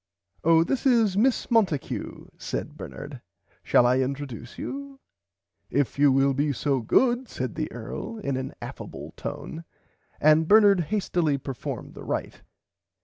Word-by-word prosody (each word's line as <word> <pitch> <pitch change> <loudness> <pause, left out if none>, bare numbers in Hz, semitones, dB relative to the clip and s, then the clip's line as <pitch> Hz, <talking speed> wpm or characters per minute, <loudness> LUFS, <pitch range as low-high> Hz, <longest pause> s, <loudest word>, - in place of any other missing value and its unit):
Oh 165 0 +5
this 270 +8 0
is 225 -6 +4
Miss 245 +4 +2
Monticue 200 - 0
said - - -5
Bernard 140 -3 -8 0.4
shall 120 - +4
I 125 +1 +3
introduce 130 -3 -4
you 275 0 -6 0.7
If 140 0 0
you 145 -1 +6
will 135 +1 +3
be 145 +2 +1
so 135 +1 0
good 245 - +2
said - - -4
the - - -3
Earl 230 - -6
in 140 -11 -2
an 130 0 -4
affable - - -8
tone 165 +1 -6 0.6
and 155 +1 +5
Bernard 205 -2 +6
hastily 175 -5 0
performed 135 -1 -6
the - - -10
right. - - -4
155 Hz, 140 wpm, -26 LUFS, 135-220 Hz, 0.7 s, you